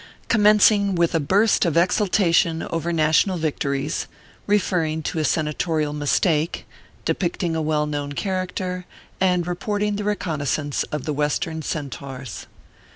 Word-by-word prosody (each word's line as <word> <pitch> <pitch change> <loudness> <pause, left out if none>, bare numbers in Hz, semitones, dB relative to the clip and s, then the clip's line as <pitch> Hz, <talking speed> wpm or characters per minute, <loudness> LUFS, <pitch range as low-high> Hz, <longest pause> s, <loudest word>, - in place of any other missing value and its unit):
COMMENCING 210 -2 +5
WITH 170 0 +2
A 165 - +2
BURST 200 +9 +3
OP 170 -2 +1
EXULTATION* 170 -2 +2
OVER 165 +1 -1
NATIONAL 160 +3 +2
VICTO 155 -3 -2
RIES, 140 +3 -2 0.4
REFERRING 170 -6 +1
TO 160 - -2
A - - +1
SENATORIAL 155 0 0
MISTAKE, 150 +2 0 0.4
DEPICTING 175 -2 -1
A 160 - 0
WELL 150 -1 +1
KNOWN 145 -1 -3
CHARACTER, 185 0 -3 0.3
AND 180 -2 +2
REPORTING 205 +3 -1
THE 210 - -3
RECONNOISSANCE 155 -8 -1
OP 150 -3 -3
THE 155 - -2
WESTERN 150 +2 -1
CENTAURS. 135 -4 -6
165 Hz, 130 wpm, -22 LUFS, 150-185 Hz, 0.4 s, COMMENCING